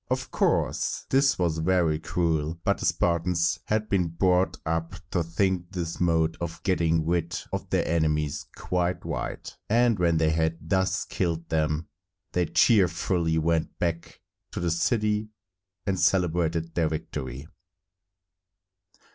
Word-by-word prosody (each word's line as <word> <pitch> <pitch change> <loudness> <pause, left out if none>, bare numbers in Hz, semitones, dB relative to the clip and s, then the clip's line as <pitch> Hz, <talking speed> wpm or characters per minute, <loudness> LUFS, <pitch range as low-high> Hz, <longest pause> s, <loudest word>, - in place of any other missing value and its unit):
Of - - -2
course, - - 0
this 140 +1 +4
was 85 -3 0
very 85 -2 +2
cruel, 80 -2 -1
but - - +1
the - - 0
Spartans 85 0 +1
had 110 0 0
been 95 -4 +1
brought 90 +3 +1
up 80 +2 -2 0.2
to 90 - +1
think 90 +2 -1
this 85 -2 -4
mode 80 -2 +2
of 85 -1 -5
getting 85 -4 +1
rid 85 0 0
of - - -4
their - - +1
enemies 75 -3 0
quite 90 0 -1
right; - - -5
and 115 -1 +3
when 85 -2 +3
they 80 -1 +3
had 80 +1 0
thus 95 0 +1
killed 85 -2 -2
them, 80 0 0 0.4
they 90 -2 +1
cheerfully 85 -5 +3
went 80 0 0
back 85 -1 -3 0.3
to - - -3
the 85 -1 0
city 105 +4 +1 0.6
and 95 -2 0
celebrated 85 -3 +1
their 80 -2 +1
victory. 70 -3 -5
85 Hz, 135 wpm, -26 LUFS, 80-90 Hz, 0.6 s, this